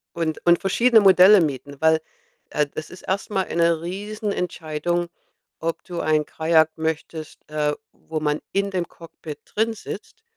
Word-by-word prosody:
Und 165 -1 -2
und 175 0 +5
verschiedene 230 +4 +4
Modelle 195 0 +8
mieten. 140 -2 -3
Weil, 160 0 +4 0.5
äh, 150 -1 +1
das 155 +2 -7
ist 180 - -11
erst 195 +1 -2
mal 190 -2 +1
eine 170 -1 +1
Riesenentscheidung, 175 -4 -3 0.5
ob 165 0 -3
du 175 -2 -5
ein 155 -1 +2
Kajak 160 0 +3
möchtest, 160 -1 -4
äh, 150 -1 0 0.2
wo 160 0 -6
man 150 -1 0
in 200 0 0
dem 180 -3 -1
Cockpit 160 -2 -10
drinsitzt 225 - -4
170 Hz, 145 wpm, -23 LUFS, 155-190 Hz, 0.5 s, Modelle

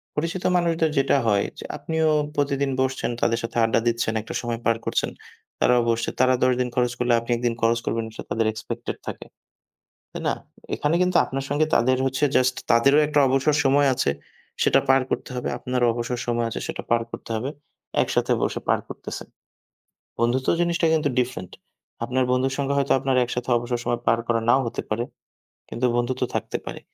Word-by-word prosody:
পরিচিত 165 +4 -2
মানুষদের 165 -2 +2
যেটা 135 +1 +3
হয়, 100 -2 +3 0.2
যে - - -7
আপনিও 160 -1 0 0.3
প্রতিদিন 140 -1 0
বসছেন, 130 -1 -1
তাদের 115 -1 +2
সাথে 115 +1 -4
আড্ডা 115 0 +3
দিচ্ছেন, 115 -1 +1
একটা 110 - -8
সময় 120 -1 -3
পার 115 - +3
করছেন, - - 0 0.5
তারাও 125 -1 +4
বসছে। 115 0 0
তারা 130 0 +5
১০ 130 0 +4
দিন 125 -1 0
খরচ 125 -1 +2
করলে 120 -1 +2
আপনি 115 - -5
একদিন 120 -1 0
খরচ 115 +1 +3
করবেন 115 0 -1
সেটা - - -7
তাদের 115 0 +1
এক্সপেকটেড 115 +2 -5
থাকে। - - -6 0.9
তাই - - -6
না? - - +2 0.4
এখানে 150 +3 0
কিন্তু 180 -1 +3
আপনার 135 0 -4
সঙ্গে 150 +2 +2
তাদের 130 +2 +3
হচ্ছে 135 +2 -1
জাস্ট 130 0 +3 0.2
তাদেরও 140 +6 +5
একটা 150 -1 +2
অবসর 135 +3 +2
সময় 140 +1 +4
আছে। 95 - +1 0.5
সেটা - - +5
পার 135 0 +6
করতে - - -2
হবে। 125 - -2
আপনারও 125 0 0
অবসর 120 +1 -3
সময় 120 -1 0
আছে - - -4
সেটা - - -4
পার 115 0 +3
করতে - - -8
হবে। 125 +5 -2 0.5
একসাথে - - 0
বসে - - -1
পার - - +3
করতেছেন। - - -7 0.9
বন্ধুত্ব 120 +3 +1
জিনিসটা 170 0 +1
কিন্তু 150 -2 +2
ডিফরেন্ট। 120 -7 -3 0.5
আপনার 130 +1 +1
বন্ধুর 130 +1 +1
সঙ্গে 140 0 0
হয়তো 140 -1 +1
আপনার 135 -1 0
একসাথে 125 +1 -4
অবসর 120 0 -2
সময় 120 0 -1
পার 115 +1 +4
করা 115 -1 +2
নাও 130 - +6
হতে 115 - -3
পারে, 110 +2 0 0.7
কিন্তু 120 +2 -1
বন্ধুত্ব 120 +1 -1
থাকতে - - -2
পারে। - - -6
125 Hz, 185 wpm, -24 LUFS, 120-140 Hz, 0.9 s, পার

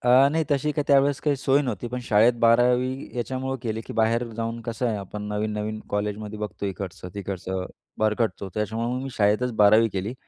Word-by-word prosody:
अ, 130 +3 +6
नाही 160 0 +1
तशी 145 +1 +1
काही 150 -1 -1
त्यावेळेस 140 0 +4
काही 145 -2 +1
सोय 135 +1 +3
नव्हती. 120 -4 -3
पण 125 +1 -4
शाळेत 110 +1 +4
12वी 125 +3 +3
याच्यामुळं 130 +2 -2
केली, 110 -1 -2
की - - -6
बाहेर 115 +2 +2
जाऊन 115 0 -3
कसं 120 +2 -2
आहे 110 -3 0
आपण 100 +1 -7
नवीन-नवीन 105 +1 -2
कॉलेजमध्ये 105 +1 -3
बघतो 105 -1 -4
इकडचं-तिकडचं, 95 0 -5 0.3
भरकटतो. 110 -2 0
तर - - -16
त्याच्यामुळे 110 +2 -2
मग 130 - -3
मी 135 - -5
शाळेतच 110 +4 +2
12वी 110 +3 +6
केली 100 +5 -3
115 Hz, 180 wpm, -25 LUFS, 105-125 Hz, 0.3 s, अ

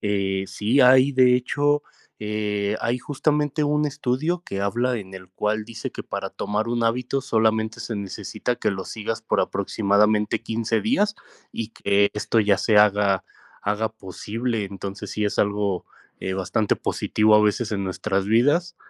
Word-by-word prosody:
eh, 95 -2 -1
sí, 115 +7 +1
hay 130 +2 +6
de 125 -1 +5
hecho, 145 +3 +1 0.4
eh, 105 -1 -2
hay 120 +2 0
justamente 150 +2 0
un 150 +1 +1
estudio 150 +5 -1
que 100 - -4
habla, 120 +5 0
en 95 -1 -9
el 95 -1 -10
cual 105 +3 -1
dice 110 -1 -7
que - - -6
para - - -4
tomar 105 +2 -2
un 120 0 0
hábito 125 +4 0
solamente 110 -3 +1
se 115 0 -4
necesita 100 +4 -4
que - - 0
lo 95 -1 -5
sigas 115 +1 -4
por 110 - +1
aproximadamente 105 +1 +1
15 115 0 -1
días 210 -3 +1 0.4
y 115 - -4
que 100 -2 +2
esto 110 +2 +1
ya 100 -2 +3
se 110 -3 +2
haga 105 -2 +4 0.4
haga 105 +2 0
posible. 110 +2 -4
Entonces 100 0 -7
sí 105 - -1
es 105 - -2
algo, 100 -2 0 0.3
eh, 95 0 -3
bastante 95 +3 0
positivo 110 0 +2
a 105 - +6
veces 105 +2 +1
en 100 -2 -1
nuestras 95 +1 -1
vidas 145 +10 +2
110 Hz, 160 wpm, -23 LUFS, 100-125 Hz, 0.4 s, hay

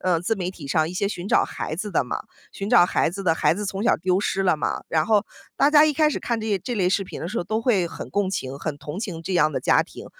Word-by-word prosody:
呃， 180 -2 +1
自 200 +7 -1
媒 180 -3 -3
体 165 -6 -10
上 155 +3 +1
一 175 - -7
些 200 - 0
寻 185 -1 -5
找 - - +4
孩 155 - -5
子 210 +4 -4
的 - - +2
嘛， - - -4 0.3
寻 200 +2 -5
找 175 - +7
孩 - - +1
子 195 +2 -6
的 165 -3 +2
孩 - - +2
子 205 +5 -3
从 195 +1 -3
小 - - +4
丢 185 +2 +1
失 195 -1 -1
了 180 -4 +3
嘛， - - -2
然 155 -1 +1
后 215 -1 +2 0.3
大 285 - +4
家 300 0 +7
一 310 - +2
开 305 +1 +3
始 - - -2
看 235 -2 -2
这 220 - -4
些 200 -2 +1
这 245 +7 -4
类 185 -4 +2
视 195 +1 +1
频 - - -8
的 165 - -4
时 215 - -5
候 - - -1
都 220 +4 -1
会 205 -8 +2
很 - - -8
共 200 -1 0
情， 135 -7 -4
很 150 -2 -4
同 150 +6 -7
情 175 -7 -5
这 185 +2 -3
样 155 -2 +3
的 - - -2
家 - - +3
庭。 - - -12
190 Hz, 330 characters per minute, -23 LUFS, 170-210 Hz, 0.3 s, 找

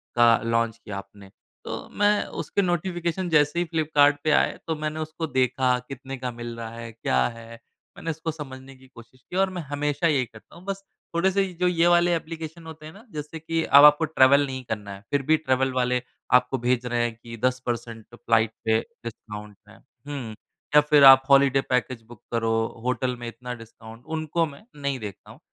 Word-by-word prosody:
का 120 -1 +6
लॉन्च 115 0 0
किया 100 -3 -6
आपने। 100 0 -11 0.4
तो - - -6
मैं 205 0 +3 0.2
उसके 200 - -1
नोटिफ़िकेशन 175 0 -1
जैसे 150 0 +3
ही 175 - +1
फ्लिपकार्ट 150 -3 +3
पे 155 - +2
आए - - +2
तो 160 - -1
मैंने 155 0 -4
उसको 160 +1 -4
देखा 130 -2 +1
कितने 135 0 -7
का 125 -1 -4
मिल 120 0 -7
रहा 115 -1 -6
है, 115 0 -8
क्या 65 - 0
है? 115 0 -10 0.4
मैंने 165 - -3
उसको 160 +1 -4
समझने 135 -3 -10
की 130 0 -19
कोशिश 120 +1 -17
की - - -7
और 195 0 +3
मैं 180 -2 -5
हमेशा 145 +2 -1
यही 140 -5 +2
करता 110 -2 -17
हूँ 170 - -14
बस 195 0 -4 0.3
थोड़े-से 190 +3 +2
ये 190 -2 -5
जो 180 - +3
ये 175 -1 +3
वाले 175 0 +4
ऐप्लीकेशन 165 0 -5
होते 160 -1 -10
हैं 155 - -10
ना 200 - -15
जैसे 150 +1 -6
कि 165 +1 -1
अब 140 -1 +7
आपको 150 +2 +6
ट्रैवल 140 -2 +5
नहीं 130 -1 -6
करना 105 -2 -4
है। 100 - -11
फ़िर 145 - +2
भी 155 0 +5
ट्रैवल 130 -3 0
वाले 125 -1 +1 0.3
आपको 125 +1 +4
भेज 125 0 0
रहे 120 -1 0
हैं 120 -1 -1
कि 115 0 -11
10% 120 -3 -2
फ्लाइट 115 -2 +1
पे 110 0 +3 0.2
डिस्काउंट 105 -2 -8
है। 110 - -16
हुँ 135 -5 -9 0.4
या 150 - +9
फ़िर 150 -1 +4
आप 135 -1 +10
हॉलिडे 135 -1 +5
पैकेज 125 -1 0
बुक 120 -2 -14
करो, 115 -1 0 0.3
होटल 125 0 0
में 120 - -6
इतना 125 +2 -7
डिस्काउंट 115 0 -13
उनको 160 +1 -1
मैं 150 +5 -11
नहीं 140 -2 -3
देखता 105 -4 -9
हूँ। - - -16
135 Hz, 200 wpm, -25 LUFS, 120-160 Hz, 0.4 s, आप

